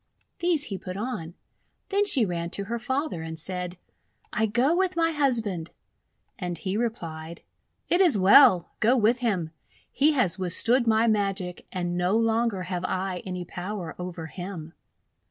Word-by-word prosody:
These 340 Hz, -4 st, +2 dB
he 195 Hz, -9 st, -5 dB
put 185 Hz, 0 st, -7 dB
on. 205 Hz, -7 st, -5 dB, 0.5 s
Then 405 Hz, +1 st, +2 dB
she 255 Hz, -, +4 dB
ran 170 Hz, -2 st, -3 dB
to 200 Hz, -, -3 dB
her 235 Hz, +4 st, -4 dB
father, 260 Hz, -, -2 dB
and 160 Hz, 0 st, -6 dB
said: 180 Hz, +1 st, -4 dB, 0.3 s
— -, -, -39 dB
"I 220 Hz, +1 st, +1 dB
go 250 Hz, +9 st, +2 dB
with 375 Hz, 0 st, +1 dB
my 330 Hz, -1 st, +2 dB
husband." 230 Hz, -, 0 dB, 0.7 s
And 175 Hz, -3 st, -3 dB
he 190 Hz, +4 st, -3 dB
replied: 170 Hz, -8 st, -4 dB, 0.2 s
— -, -, -49 dB
"It 350 Hz, -, +3 dB
is 340 Hz, -, +5 dB
well; 190 Hz, -2 st, +6 dB
go 240 Hz, +4 st, +4 dB
with 235 Hz, +2 st, +3 dB
him. 190 Hz, -10 st, -1 dB, 0.4 s
He 300 Hz, +3 st, +3 dB
has 200 Hz, -, +1 dB
withstood 230 Hz, +7 st, +2 dB
my 220 Hz, 0 st, +4 dB
magic, 195 Hz, -5 st, -1 dB
and 175 Hz, -2 st, -2 dB
no 180 Hz, +4 st, +2 dB
longer 225 Hz, -3 st, +1 dB
have 180 Hz, -1 st, -4 dB
I 185 Hz, -1 st, -2 dB
any 180 Hz, -1 st, -4 dB
power 180 Hz, -1 st, -5 dB
over 180 Hz, -2 st, -6 dB
him." 170 Hz, -1 st, -7 dB
200 Hz, 165 wpm, -26 LUFS, 180-240 Hz, 0.7 s, well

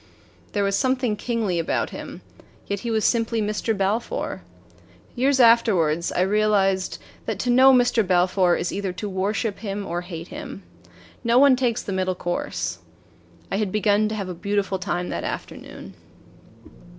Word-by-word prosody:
There 205 Hz, -, +1 dB
was 200 Hz, 0 st, +1 dB
something 255 Hz, -2 st, +1 dB
kingly 210 Hz, -5 st, -1 dB
about 165 Hz, -, -1 dB
him -, -, -8 dB, 0.4 s
yet 200 Hz, -1 st, -3 dB
he 235 Hz, -, -4 dB
was 220 Hz, -2 st, +1 dB
simply 230 Hz, -1 st, +1 dB
Mr. 215 Hz, +1 st, -1 dB
Balfour. 195 Hz, -, -2 dB, 0.7 s
Years 265 Hz, +2 st, +2 dB
afterward 200 Hz, -10 st, +4 dB
I -, -, +2 dB
realized 195 Hz, -1 st, +2 dB, 0.3 s
that -, -, -2 dB
to 245 Hz, -, 0 dB
know 260 Hz, +2 st, +7 dB
Mr. 245 Hz, -2 st, +4 dB
Balfour 180 Hz, 0 st, +3 dB
is 175 Hz, -, -2 dB
either 195 Hz, -2 st, -3 dB
to 205 Hz, +3 st, -5 dB
worship 200 Hz, +2 st, -2 dB
him 200 Hz, -2 st, -4 dB
or 175 Hz, +1 st, -3 dB
hate 175 Hz, -1 st, -8 dB
him. 275 Hz, -8 st, -8 dB, 0.6 s
No 235 Hz, 0 st, +3 dB
one 275 Hz, 0 st, +7 dB
takes 245 Hz, -3 st, 0 dB
the 195 Hz, -, -4 dB
middle 185 Hz, -1 st, -1 dB
course. 90 Hz, -, -3 dB, 0.7 s
I -, -, 0 dB
had 205 Hz, -2 st, -1 dB
begun 210 Hz, 0 st, +2 dB
to 220 Hz, -, -3 dB
have 200 Hz, -3 st, -4 dB
a 180 Hz, -, -4 dB
beautiful 200 Hz, +2 st, -1 dB
time 180 Hz, -1 st, -2 dB
that -, -, -3 dB
afternoon. -, -, -7 dB
205 Hz, 160 wpm, -23 LUFS, 185-230 Hz, 0.7 s, know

